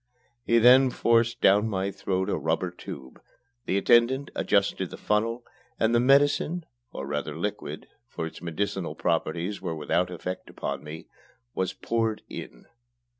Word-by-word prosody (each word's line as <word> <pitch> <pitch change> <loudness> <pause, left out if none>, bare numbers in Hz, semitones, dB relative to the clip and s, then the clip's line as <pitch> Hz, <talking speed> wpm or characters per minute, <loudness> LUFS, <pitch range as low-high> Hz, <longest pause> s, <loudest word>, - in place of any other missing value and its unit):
He 115 - +3
then 130 +3 +7
forced 115 0 +2
down 105 +3 +5
my 95 -1 -1
throat 95 -1 -2
a - - 0
rubber 80 +3 -1
tube, 70 -6 -10 0.5
the 95 - +1
attendant 120 +6 +3
adjusted - - +1
the - - -9
funnel, 115 +3 0 0.4
and 110 +1 +2
the 120 - +5
medicine, 145 +6 +3 0.3
or 70 - -6
rather 75 +2 -3
liquid 105 +4 -4 0.2
for 80 - -5
its 80 - -8
medicinal 90 +2 -3
properties 90 +4 -1
were 85 -3 -3
without 85 +4 0
effect 90 +1 -6
upon - - -5
me 75 +2 -8 0.5
was 95 -1 -1
poured 115 -2 -1
in. - - -9
100 Hz, 145 wpm, -27 LUFS, 85-115 Hz, 0.5 s, then